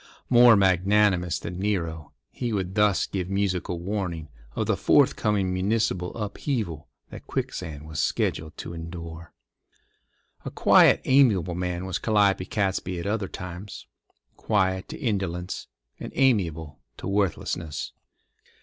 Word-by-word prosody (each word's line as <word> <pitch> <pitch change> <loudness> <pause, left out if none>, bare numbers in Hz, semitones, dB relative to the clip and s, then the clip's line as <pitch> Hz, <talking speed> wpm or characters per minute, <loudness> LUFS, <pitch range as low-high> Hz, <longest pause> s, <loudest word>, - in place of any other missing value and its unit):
More 120 -1 +8
magnanimous 95 -2 +3
than 90 +1 -6
Nero, 85 -6 -2 0.2
he 120 -2 -3
would 95 -3 -2
thus 105 -1 +3
give 95 -2 -4
musical 95 -3 -1
warning 90 -4 -3 0.3
of - - -1
the - - +1
forthcoming 100 -3 +2
municipal 95 -2 0
upheaval 105 - -3 0.2
that - - -10
Quicksand 75 -1 -4
was 75 -1 -5
scheduled 80 +3 -1
to 85 - -7
endure. 85 0 -8 1.1
A - - -4
quiet, - - +5
amiable 110 - +4
man 90 +1 -3
was 95 - -2
Calliope 100 -4 +2
Catesby 95 -3 -1
at 85 - -6
other 100 -1 -1
times—quiet 95 +1 -4
to - - -6
indolence, 95 - -3 0.3
and - - -7
amiable 80 - +1 0.2
to - - -6
worthlessness. 85 -7 -2
95 Hz, 120 wpm, -25 LUFS, 85-105 Hz, 1.1 s, More